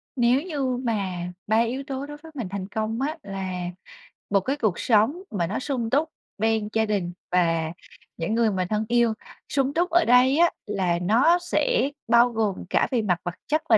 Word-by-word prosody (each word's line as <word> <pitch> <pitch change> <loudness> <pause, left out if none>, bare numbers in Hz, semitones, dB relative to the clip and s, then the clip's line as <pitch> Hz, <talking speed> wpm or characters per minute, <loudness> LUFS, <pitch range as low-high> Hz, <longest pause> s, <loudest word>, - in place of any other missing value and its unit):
Nếu 245 +1 +3
như 280 -7 -2
mà 205 -6 -1 0.3
3 220 +1 +3
yếu 240 +4 0
tố 270 0 -4
đối 295 0 -9
với 320 +2 -14
mình 245 -8 -3
thành 195 -1 -4
công 220 +3 -3
á, 305 +4 -1
là 195 -1 -4 0.8
một 200 - +4
cái 265 +8 -1
cuộc 215 -10 0
sống 240 - +2
mà 175 -5 -1
nó 200 - -2
sung 255 -4 -2
túc 295 +6 +1 0.3
bên 220 0 +1
gia 220 0 +2
đình 195 -5 -1 0.2
và 165 -3 +2 0.5
những 170 +6 -1
người 230 -2 +3
mà 185 -2 -1
thân 215 0 0
yêu. 235 -1 +3 0.4
Sung 275 -1 0
túc 350 +3 +1
ở 345 0 +4
đây 250 +3 +5
á 345 +1 +5
là 185 -5 0
nó 245 - +4
sẽ 475 - +1 0.2
bao 235 +1 +5
gồm 220 -4 -2
cả - - +2
về 245 -3 +2
mặt 180 -5 0
vật 175 0 -3
chất 310 +1 +1
và 220 - +7
230 Hz, 200 wpm, -25 LUFS, 200-275 Hz, 0.8 s, và